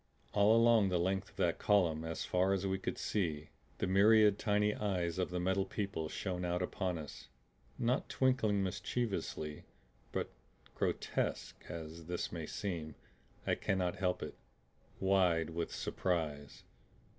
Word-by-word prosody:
All 105 Hz, +2 st, +5 dB
along 115 Hz, -3 st, +5 dB
the 90 Hz, -, +2 dB
length 95 Hz, +2 st, 0 dB
of -, -, -23 dB
that -, -, +1 dB
column 85 Hz, -6 st, +3 dB
as 80 Hz, 0 st, -3 dB
far 95 Hz, +2 st, +2 dB
as 100 Hz, 0 st, -1 dB
we 95 Hz, 0 st, 0 dB
could -, -, -3 dB
see 80 Hz, -7 st, -1 dB, 0.3 s
the -, -, 0 dB
myriad 105 Hz, +2 st, +5 dB
tiny 105 Hz, 0 st, +2 dB
eyes 90 Hz, -5 st, -1 dB
of 90 Hz, -, 0 dB
the 90 Hz, 0 st, -2 dB
Metal 95 Hz, +2 st, +1 dB
People 95 Hz, -7 st, -3 dB
shone 90 Hz, 0 st, -3 dB
out 90 Hz, +1 st, 0 dB
upon 90 Hz, -1 st, -2 dB
us, 75 Hz, -3 st, -8 dB, 0.5 s
not 125 Hz, +3 st, 0 dB
twinkling 110 Hz, -7 st, +2 dB
mischievously, 95 Hz, -5 st, -2 dB, 0.5 s
but -, -, -2 dB, 0.4 s
grotesque -, -, -2 dB
as 80 Hz, -1 st, -7 dB
this 90 Hz, 0 st, -2 dB
may 80 Hz, -3 st, -5 dB
seem, 85 Hz, -7 st, -4 dB, 0.5 s
I -, -, +2 dB
cannot 90 Hz, -2 st, 0 dB
help 90 Hz, -2 st, 0 dB
it -, -, -5 dB, 0.7 s
wide 90 Hz, -4 st, +3 dB
with 85 Hz, +1 st, -3 dB
surprise. 75 Hz, -6 st, -2 dB
95 Hz, 145 wpm, -35 LUFS, 85-100 Hz, 0.7 s, All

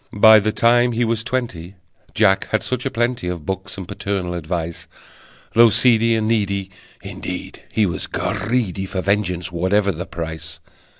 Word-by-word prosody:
By 110 Hz, +1 st, +8 dB
the 110 Hz, +1 st, 0 dB
time 120 Hz, +3 st, +3 dB
he 120 Hz, +1 st, +1 dB
was 115 Hz, -1 st, -1 dB
twenty 105 Hz, -9 st, -4 dB, 0.4 s
Jack 95 Hz, -3 st, +3 dB
had 110 Hz, -, -1 dB
such 125 Hz, +3 st, -2 dB
a -, -, -1 dB
plenty 120 Hz, -5 st, -1 dB
Of 85 Hz, -4 st, -4 dB
books 95 Hz, +2 st, -4 dB
and 95 Hz, -3 st, -7 dB
paternal 95 Hz, -3 st, -3 dB
advice, 85 Hz, 0 st, -4 dB, 0.7 s
Though 115 Hz, 0 st, +7 dB
seedy 115 Hz, 0 st, +3 dB
and 110 Hz, -1 st, 0 dB
needy, 100 Hz, -3 st, 0 dB, 0.3 s
Indeed -, -, -7 dB
he 110 Hz, -, +2 dB
was 90 Hz, -, -2 dB
greedy 100 Hz, -3 st, -2 dB
For 95 Hz, -1 st, -3 dB
vengeance, 95 Hz, -3 st, -1 dB
whatever 95 Hz, +4 st, +1 dB
the 90 Hz, +1 st, -6 dB
price! 80 Hz, -1 st, -7 dB
100 Hz, 160 wpm, -20 LUFS, 90-115 Hz, 0.7 s, By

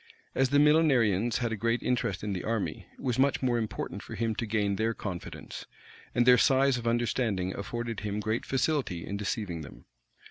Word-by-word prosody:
As 135 Hz, -1 st, +2 dB
the 145 Hz, -, +3 dB
Millenarians 130 Hz, -, +4 dB
had 120 Hz, -2 st, 0 dB
a -, -, 0 dB
great 115 Hz, +3 st, 0 dB
interest 105 Hz, -7 st, -1 dB
in 105 Hz, -1 st, -2 dB
the 90 Hz, -, -4 dB
army, 110 Hz, -2 st, -2 dB
it -, -, -15 dB
was 125 Hz, -1 st, -1 dB
much 135 Hz, 0 st, +2 dB
more 120 Hz, -2 st, +2 dB
important 110 Hz, -2 st, -4 dB
for -, -, -8 dB
him 115 Hz, -1 st, 0 dB
to 115 Hz, +1 st, -3 dB
gain 105 Hz, -2 st, 0 dB
their 115 Hz, +1 st, 0 dB
confidence; 90 Hz, -4 st, -7 dB, 0.5 s
and 120 Hz, -, +4 dB
their 125 Hz, -1 st, +7 dB
size 135 Hz, -1 st, +4 dB
of 115 Hz, -, -5 dB
understanding 115 Hz, -5 st, 0 dB
afforded 115 Hz, +2 st, -4 dB
him 105 Hz, 0 st, -3 dB
great 110 Hz, +2 st, -1 dB
facility 135 Hz, -, -1 dB
in 100 Hz, -, -4 dB
deceiving 100 Hz, -4 st, -3 dB
them. 75 Hz, -, -12 dB
115 Hz, 190 wpm, -29 LUFS, 105-125 Hz, 0.5 s, their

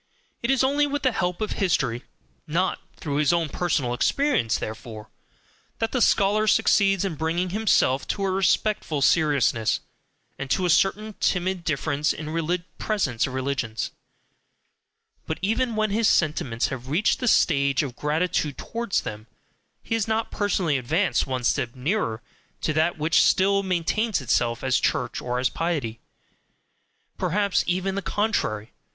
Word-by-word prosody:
It 235 Hz, -, -2 dB
is 270 Hz, -1 st, +3 dB
only 285 Hz, +2 st, +2 dB
with 290 Hz, 0 st, -3 dB
the 260 Hz, -, +3 dB
help 180 Hz, -3 st, -2 dB
of 215 Hz, -, -2 dB
history 135 Hz, -, 0 dB, 0.4 s
(NOT 170 Hz, +5 st, 0 dB, 0.2 s
through 145 Hz, -2 st, -3 dB
his 150 Hz, +1 st, +3 dB
own 170 Hz, -2 st, +1 dB
personal 140 Hz, -7 st, -1 dB
experience, 250 Hz, -, +1 dB
therefore) 110 Hz, -1 st, -7 dB, 0.7 s
that 225 Hz, -1 st, -1 dB
the 255 Hz, -, 0 dB
scholar 210 Hz, +1 st, +3 dB
succeeds 195 Hz, -2 st, +3 dB
in 190 Hz, -, -2 dB
bringing 165 Hz, +4 st, -1 dB
himself 190 Hz, -10 st, +2 dB
to 200 Hz, -, -2 dB
a 190 Hz, -, 0 dB
respectful 190 Hz, -5 st, +1 dB
seriousness, 140 Hz, -8 st, +2 dB, 0.6 s
and 140 Hz, -, -5 dB
to 185 Hz, -, +1 dB
a 175 Hz, -, +3 dB
certain 205 Hz, +6 st, +2 dB
timid 180 Hz, -1 st, 0 dB
deference 150 Hz, -1 st, 0 dB
in 155 Hz, +1 st, -6 dB, 0.4 s
presence 145 Hz, -, 0 dB
of 130 Hz, -, -6 dB
religions; 130 Hz, -5 st, -2 dB, 1.4 s
but 160 Hz, -, -2 dB
even 225 Hz, +3 st, 0 dB
when 215 Hz, -1 st, 0 dB
his 220 Hz, +1 st, +2 dB
sentiments 135 Hz, -8 st, +1 dB
have 130 Hz, -1 st, -6 dB
reached 170 Hz, +9 st, +1 dB
the 250 Hz, -, -2 dB
stage 140 Hz, -, +3 dB
of 130 Hz, -4 st, -5 dB
gratitude 150 Hz, 0 st, -1 dB
towards 230 Hz, -3 st, -2 dB
them, 110 Hz, +1 st, -7 dB, 0.6 s
he -, -, -4 dB
has 225 Hz, -2 st, 0 dB
not 220 Hz, 0 st, -1 dB
personally 185 Hz, -8 st, 0 dB
advanced 160 Hz, +11 st, 0 dB
one 130 Hz, -2 st, -3 dB
step 125 Hz, -1 st, 0 dB
nearer 125 Hz, -, -1 dB, 0.4 s
to 155 Hz, -, 0 dB
that 160 Hz, +3 st, +1 dB
which 155 Hz, +2 st, +3 dB
still 200 Hz, +1 st, +3 dB
maintains 190 Hz, +4 st, 0 dB
itself 120 Hz, -2 st, 0 dB
as 130 Hz, -1 st, +2 dB
Church -, -, -1 dB
or 125 Hz, 0 st, -2 dB
as 125 Hz, +1 st, +1 dB
piety; 145 Hz, -10 st, -2 dB, 1.2 s
perhaps 195 Hz, +2 st, +1 dB
even 185 Hz, +2 st, 0 dB
the 200 Hz, -, -2 dB
contrary. 170 Hz, -, -1 dB
170 Hz, 150 wpm, -24 LUFS, 135-205 Hz, 1.4 s, is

